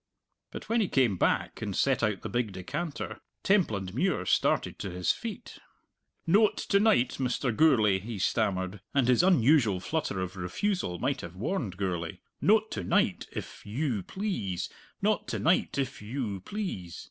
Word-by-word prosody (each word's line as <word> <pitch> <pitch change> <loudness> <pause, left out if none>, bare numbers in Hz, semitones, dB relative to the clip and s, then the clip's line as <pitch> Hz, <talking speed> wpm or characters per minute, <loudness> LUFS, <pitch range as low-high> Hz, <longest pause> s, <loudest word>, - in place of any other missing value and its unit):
But - - -8
when 230 0 +2
he 205 - +1
came 125 - +2
back - - 0
and 100 -4 -3
set 135 -3 +2
out 105 -4 0
the - - -3
big 120 -3 -1
decanter 145 - -4 0.2
Templandmuir 125 - +1
started - - +1
to 100 - -4
his 90 0 +1
feet. 235 +1 -7 0.7
"Noat 205 +5 +4
to 200 - +5
night, 210 - +3
Mr. 125 -2 0
Gourlay," 110 -11 +4
he 110 +3 -6
stammered 95 -1 0
and 135 -4 +3
his 125 +3 +5
unusual 140 - +4
flutter 120 - -2
of 95 0 -4
refusal 90 - -2
might 135 +9 -1
have 85 0 -8
warned 105 - -2
Gourlay 90 -4 -2 0.2
"noat 220 +1 +3
to 100 - -3
night, - - +1
if - - -7
you 115 0 -1
please; 140 - -3 0.3
noat - - +1
to - - -2
night, - - +2
if 135 -3 -2
you 105 -2 -3
please. 95 - -5
115 Hz, 160 wpm, -29 LUFS, -, 0.7 s, to